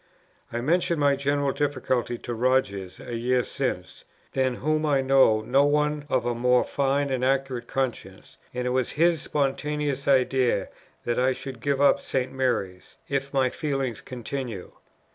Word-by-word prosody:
I 120 - -2
mentioned 170 +4 +1
my 140 -1 +4
general 140 0 0
difficulty 130 -4 -1
to 120 - -6
Rogers 110 -6 0
a 120 - -6
year 125 +2 +1
since, - - -4 0.3
than 130 -2 +1
whom 155 +4 0
I 145 -3 +2
know 130 -5 +4
no 135 +6 +3
one 150 0 +1
of 130 - +1
a 120 - +1
more 125 +1 +3
fine 140 0 0
and 130 -1 -1
accurate 130 -2 0
conscience, 135 -2 -4
and 125 0 -3
it 125 - 0
was 130 -1 0
his 165 -1 +3
spontaneous 145 0 -1
idea 130 -6 +2 0.4
that 120 - 0
I 130 +1 +3
should 130 -2 -8
give 140 +1 0
up 140 0 +5
St. 130 -1 -2
Mary's, 110 -9 -2
if 140 0 -2
my 130 -2 +2
feelings 135 -6 -2
continued. 125 -5 -6
130 Hz, 160 wpm, -26 LUFS, 125-140 Hz, 0.4 s, up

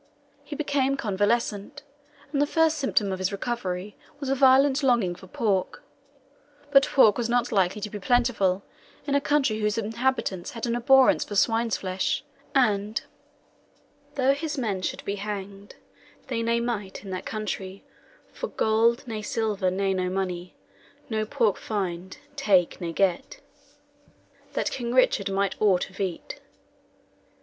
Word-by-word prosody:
He 295 - -7
became 275 -2 0
convalescent, 210 +5 -1 0.5
and 280 - +2
the 290 - +3
first 320 0 +2
symptom 215 -7 +1
of 190 - -3
his 185 +2 0
recovery 200 -3 -4 0.2
was 280 -2 -4
a - - +3
violent 270 +1 +5
longing 240 -9 +2
for 190 +2 -13
pork. 195 -2 -1 0.9
But 275 -1 +6
pork 225 -5 +5
was 235 -1 -1
not 245 0 +1
likely 195 0 +1
to 210 - -4
be 210 - -5
plentiful 200 -4 +2 0.4
in 285 - -1
a 280 - +3
country 275 -7 +1
whose 210 0 0
inhabitants 225 -4 -1
had 230 - -4
an 235 0 0
abhorrence 265 +2 +5
for 205 - -7
swine's 225 +2 +2
flesh; 185 0 -2 0.3
and 215 -4 +2 1.1
"Though 270 0 +3
his 305 +1 -4
men 210 -7 -1
should - - -4
be 200 +1 -2
hanged, 200 0 -6 0.5
They 235 -3 -1
ne 230 +1 +1
might, 215 -6 -4
in 195 - -7
that 185 - -5
countrey, 200 -3 -5 0.5
For - - -4
gold, 230 - +1
ne 220 -2 -4
silver, 210 -3 -1
ne 195 +1 0
no 185 -1 -1
money, 180 -1 -3 0.6
No 215 -1 -1
pork 230 -6 +1
find, 185 -3 -4 0.2
take, 195 - +2
ne 170 -1 -3
get, 180 0 0 1.1
That - - -1
King 240 -1 -3
Richard 200 -6 +3
might 195 0 -1
aught 190 -3 +2
of 185 - -15
eat. 190 -4 -4
215 Hz, 150 wpm, -26 LUFS, 195-255 Hz, 1.1 s, But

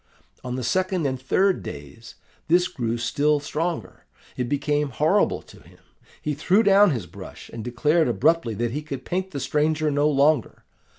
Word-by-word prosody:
On 125 0 -4
the 130 - -4
second 185 +5 0
and 130 -2 -2
third 190 +8 +2
days 75 +11 -10 0.3
this 175 +2 +4
grew 120 -7 -3
still 145 +5 +1
stronger. 150 - -4 0.3
It 125 -1 -3
became 145 0 0
horrible 155 +10 +1
to - - -16
him. - - -19 0.4
He 150 - -2
threw 190 +9 +2
down 200 0 +6
his 120 - -2
brush, 85 - -11
and 115 -1 -6
declared 150 +7 +1
abruptly 130 -1 +1
that 120 +2 -1
he 145 +5 -3
could 140 -4 -7
paint 185 +1 -2
the 145 - -5
stranger 150 +3 0
no 145 +1 +2
longer. 145 -2 +1
145 Hz, 170 wpm, -24 LUFS, 125-165 Hz, 0.4 s, down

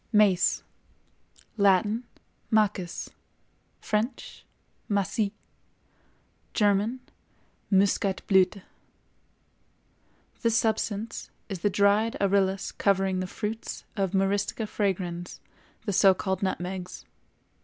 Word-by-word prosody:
MACE. 205 -5 +4 0.9
Latin—Macis; 205 -1 0 0.7
French—Macis; 210 -2 -3 1.3
German—Muscatblüthe. 200 -3 0 1.8
This 230 -2 +2
substance 220 0 -1 0.2
is 195 -3 -4
the 205 - +2
dried 205 +3 +3
arillus 195 -1 +1
covering 195 -2 +1
the 185 - -2
fruits 215 +4 -5
of 195 -2 -1
Myristica 200 +3 0
fragrans, 180 -4 -2 0.5
the 205 - -1
so 190 0 +6
called 190 0 -2
nutmegs. 185 -1 -4
200 Hz, 70 wpm, -27 LUFS, 190-210 Hz, 1.8 s, so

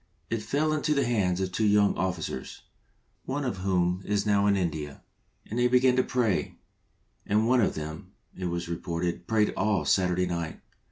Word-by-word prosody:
It 115 -1 -1
fell 145 +8 0
into 150 0 +1
the 140 -2 +2
hands 95 -6 +1
of 95 -1 -2
two 105 +3 +1
yoiing 105 -1 +4
Officers, 90 -8 -4 0.6
one 140 +2 -2
of 120 -6 -2
whom 90 -1 0
is 100 +1 0
now 100 -1 +3
in 100 - +4
India, 75 -5 -3 0.4
and 115 - -4
they 120 - +4
began 125 0 +4
to 130 - +4
pray, 115 -8 0 0.7
and 110 +2 +1
one 125 0 +4
of - - +1
them, 80 0 -7 0.2
it 95 - -5
was 85 -1 -2
reported, 85 +1 -3
prayed 110 -1 +2
all 105 -1 +1
Saturday 90 -1 +2
night. 85 -2 -4
100 Hz, 175 wpm, -27 LUFS, 90-115 Hz, 0.7 s, yoiing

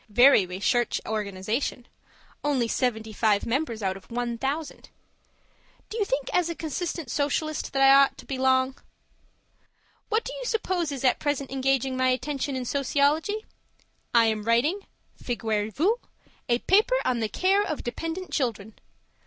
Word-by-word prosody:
Very 245 -3 +6
recherche 205 +6 0
organization. 215 +4 -3 0.6
Only 275 -5 +1
seventy 220 -2 -1
five 210 -1 +2
members 235 -3 -2
out 190 -1 0
of 195 - -13
one 240 0 -2
thousand. 280 +6 -4 1.0
Do 445 - -5
you 415 - +2
think 270 -5 -2
as 355 -2 +2
a 335 - -3
consistent 320 -3 -4
Socialist 305 +1 -1
that 270 0 +2
I 270 0 +8
ought 275 0 +5
to - - -12
belong? 260 0 +1 1.3
What 440 +1 +1
do - - -6
you - - -6
suppose 370 -9 -1
is 275 -2 -5
at 255 - +3
present 285 -3 -2
engaging 270 -1 0
my 260 0 +2
attention 270 +1 -1
in 255 -1 -3
sociology? 290 - +1 0.7
I 230 -1 +5
am 220 -1 0
writing 250 - +1 0.4
(figurez 220 -3 -1
vous!) 390 - +1 0.5
a 235 - +4
paper 420 - +3
on 245 -2 +1
the 220 -2 -1
Care 385 - +2
of 310 -7 -4
Dependent 330 +8 -5
Children. 220 -6 -2
265 Hz, 150 wpm, -26 LUFS, 230-310 Hz, 1.3 s, I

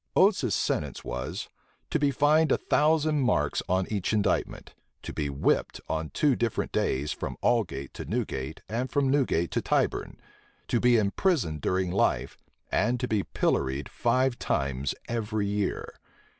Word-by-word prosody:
Oates's 185 - +4
sentence - - -1
was, 65 +1 -4 0.4
to - - +1
be 145 -1 +3
fined 150 +3 +3
a - - +4
thousand 155 -1 +2
marks 125 - +1
on 95 +1 +2
each 100 +1 -1
indictment, 105 -3 0 0.3
to - - -6
be 70 - -2
whipped 70 0 0
on 80 0 -2
two 145 -4 +2
different 115 -2 -1
days 70 +3 0
from - - -5
Aldgate 95 - 0
to - - -7
Newgate, 65 +4 -3
and 120 +5 -2
from 140 -2 +1
Newgate 125 - +1
to - - 0
Tyburn, - - 0 0.5
to 120 - +2
be 120 0 +5
imprisoned 105 - +1
during 95 +2 0
life, 95 - +1 0.4
and 125 +1 +1
to 125 - -1
be 110 -4 +1
pilloried 65 -6 -1
five 125 +1 +1
times 70 -1 -1
every 110 -3 -1
year. 100 -1 -2
110 Hz, 150 wpm, -28 LUFS, 80-130 Hz, 0.5 s, be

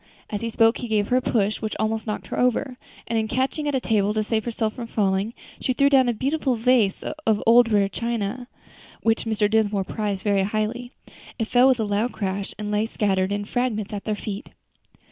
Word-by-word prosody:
As 205 - -3
he 230 - -2
spoke 225 +1 +3
he 245 - -4
gave 210 -2 0
her 250 - +3
a - - +2
push, 215 -4 0
which 215 -1 -3
almost 220 +1 -1
knocked 210 - -3
her - - -4
over, 250 +1 +1 0.3
and 230 - 0
in 220 - -1
catching 265 +5 -1
at 290 - 0
a - - +2
table 210 -3 +1
to 215 - +1
save 220 0 -1
herself 220 -2 -1
from 235 -2 -6
falling, 200 +1 0 0.2
she 255 - 0
threw 280 +2 +3
down 260 -3 +5
a - - +1
beautiful 270 +2 0
vase 230 -4 +2
of 265 -9 -1
rare - - -6
old 235 +1 +6 0.2
china, 235 +1 -3 0.6
which 225 0 +1
Mr. 215 -2 +1
Dinsmore 210 -2 +1
prized 205 -1 -3
very 200 -2 +2
highly. 215 +5 -2 0.5
It 225 - -2
fell 250 +1 +5
with 260 -2 +3
a - - +1
loud 210 +4 0
crash, 195 -1 -3
and 210 0 -4
lay 210 +1 +1
scattered 195 -3 0
in 205 0 -2
fragments 220 -3 -2
at 205 - -5
their 215 - -1
feet. 205 0 -6
220 Hz, 215 wpm, -24 LUFS, 210-245 Hz, 0.6 s, old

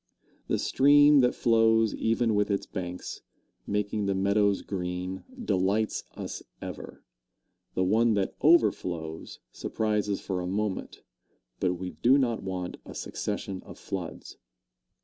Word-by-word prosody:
The - - +1
stream 145 +1 +6
that 125 -1 +3
flows 115 -1 +3
even 115 0 +1
with 105 0 +2
its 100 -1 0
banks, 90 -2 -6 0.5
making 105 0 -1
the 100 - +1
meadows 100 +1 +2
green, 90 0 -4 0.2
delights 100 - +1
us - - -6 0.2
ever; - - -8 0.7
the 95 - +2
one 110 +4 +3
that 100 -2 0
overflows 90 - +1
surprises 105 -2 -1
for 95 -2 -3
a 90 - -3
moment. 100 +1 -3 0.6
But 90 -1 +1
we 90 +1 -5
do 130 +3 +4
not 120 -5 +1
want 90 -2 -4
a - - -11
succession 95 -1 -4
of - - -12
floods. - - -6
100 Hz, 130 wpm, -28 LUFS, 95-115 Hz, 0.7 s, stream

